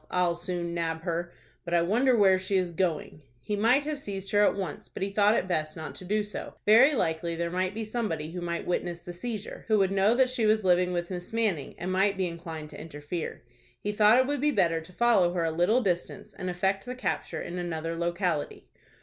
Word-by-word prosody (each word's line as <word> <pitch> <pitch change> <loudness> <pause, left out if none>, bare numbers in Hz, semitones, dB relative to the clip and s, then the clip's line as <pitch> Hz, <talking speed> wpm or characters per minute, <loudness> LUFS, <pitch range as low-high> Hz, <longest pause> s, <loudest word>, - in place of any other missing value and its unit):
"I'll 180 -1 +2
soon 175 0 -4
nab 165 -1 -2
her. 170 0 -2 0.3
But 170 0 -1
I 170 - +4
wonder 240 +7 +3
where 190 -3 +5
she 190 +1 0
is 180 -2 0
going." 165 -3 -2 0.2
He 210 - -3
might 235 +7 +3
have 300 -1 -3
seized 195 -6 -6
her 205 0 +4
at - - +3
once, 190 -6 -5
but - - -5
he 195 - -2
thought 205 +2 +4
it 185 - 0
best 155 -3 -1
not 160 - -6
to 185 - -9
do 210 +3 +1
so. 210 - -7
Very 245 +8 +7
likely 165 -4 -1
there 170 0 -2
might 185 +2 -1
be 220 0 -3
somebody 190 -9 -3
who 180 +1 -5
might 170 -1 -3
witness 175 -1 -2
the 175 - -7
seizure, 215 +3 -6
who 215 -1 +4
would 195 -2 +2
know 195 +4 +3
that 255 0 +3
she 235 -4 +1
was 215 0 +3
living 180 0 +3
with 175 0 -3
Miss 180 -1 -6
Manning, 210 -11 -1
and 180 +2 -3
might 195 +1 +2
be 190 - +1
inclined 165 -3 -6
to - - -9
interfere. 155 +1 -6 0.4
He 205 - -2
thought 210 +2 +5
it 260 - +4
would 285 0 -2
be 300 - +3
better 175 - +2
to 165 +3 -14
follow 190 -4 +3
her 175 -2 0
a 165 - 0
little 180 +10 +2
distance, 180 -5 -2
and 185 - -5
effect 190 +2 0
the 250 - -4
capture 255 - -3
in 180 +1 -5
another 165 -1 -3
locality. 170 -2 -2
185 Hz, 230 wpm, -28 LUFS, 170-210 Hz, 0.4 s, Very